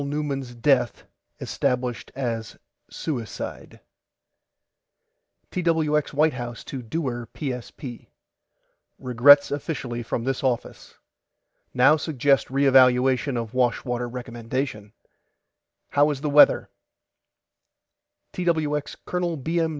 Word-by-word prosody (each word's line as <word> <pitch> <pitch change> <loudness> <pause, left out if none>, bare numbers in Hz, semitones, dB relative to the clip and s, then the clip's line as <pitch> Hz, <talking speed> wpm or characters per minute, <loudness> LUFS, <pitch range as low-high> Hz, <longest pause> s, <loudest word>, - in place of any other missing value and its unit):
NEUMAN'S 140 -3 -3
DEATH 125 0 +1 0.4
ESTABLISHED 125 -1 -2
AS 115 -4 -4 0.3
SUICIDE 125 -9 -6 1.7
TWX 160 -4 0
WHITE 155 +2 +3
HOUSE 120 -2 -6
TO 135 - -6
DEWAR 120 -2 -4
PSP: 125 -2 -6 0.9
REGRETS 135 +3 +6
OFFICIALLY 135 -5 -4
FROM 115 0 -3
THIS 135 +1 -2
OFFICE 125 -3 -3 0.8
NOW 135 +5 +5
SUGGEST 140 -3 +1
RE 140 +2 +1
EVALUATION 130 0 +4
OF 115 -1 -4
WASHWATER 125 -1 0
RECOMMENDATION 120 -2 -5 1.0
HOW 145 +1 +3
IS 140 -2 -3
THE 150 -1 -2
WEATHER 145 +1 +5 1.6
TWX 160 -5 -1
COL. 175 -2 -2
B. 165 +5 -1
M. 165 -1 +1
135 Hz, 95 wpm, -24 LUFS, 120-150 Hz, 1.7 s, REGRETS